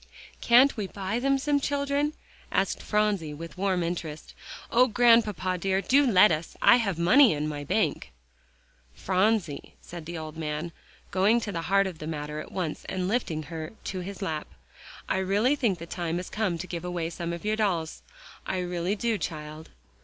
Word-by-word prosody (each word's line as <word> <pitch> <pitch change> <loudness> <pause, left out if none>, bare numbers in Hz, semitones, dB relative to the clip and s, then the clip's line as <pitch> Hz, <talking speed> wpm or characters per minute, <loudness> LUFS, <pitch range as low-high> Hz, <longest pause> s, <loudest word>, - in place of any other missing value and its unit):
"Can't 250 +4 +6
we 205 -3 -2
buy 200 +4 -3
them 275 +2 +2
some 285 +1 +1
children?" 285 +1 0 0.4
asked - - 0
Phronsie 205 -8 0
with 165 +2 -9
warm 185 -2 0
interest. 165 -3 -5 0.4
"Oh, 250 +2 +5
Grandpapa 215 -6 +3
dear, 190 +2 +1
do 275 +7 +3
let 190 0 +7
us; 155 0 -3
I 240 - +7
have 200 -8 -1
money 225 - +6
in 150 0 -2
my 145 -1 -4
bank." 65 - -1 0.8
"Phronsie," 190 -5 0
said 170 -2 -10
the 170 0 -5
old 155 -1 -6
gentleman, 155 +1 -3 0.4
going 200 +5 +3
to 210 - -4
the 165 -3 -3
heart 195 0 +4
of 180 -4 -5
the 155 - -6
matter 150 -1 -4
at - - -8
once 175 -5 -3
and 185 -1 -2
lifting 185 -8 -1
her 160 +2 -7
to 185 - -4
his 195 +2 -6
lap, 155 -5 -3 0.6
"I - - 0
really 205 +8 +2
think 230 -10 0
the 170 - -8
time 170 -1 -3
has 180 - -6
come 205 -5 -1
to 170 - -5
give 175 -2 -6
away 175 -2 -3
some 170 0 -4
of 170 +3 -6
your 215 +1 +1
dolls. 180 -7 -1 0.5
I 185 - -1
really 180 +1 -1
do, 225 -1 -1
child." 155 0 -6
185 Hz, 185 wpm, -27 LUFS, 165-215 Hz, 0.8 s, let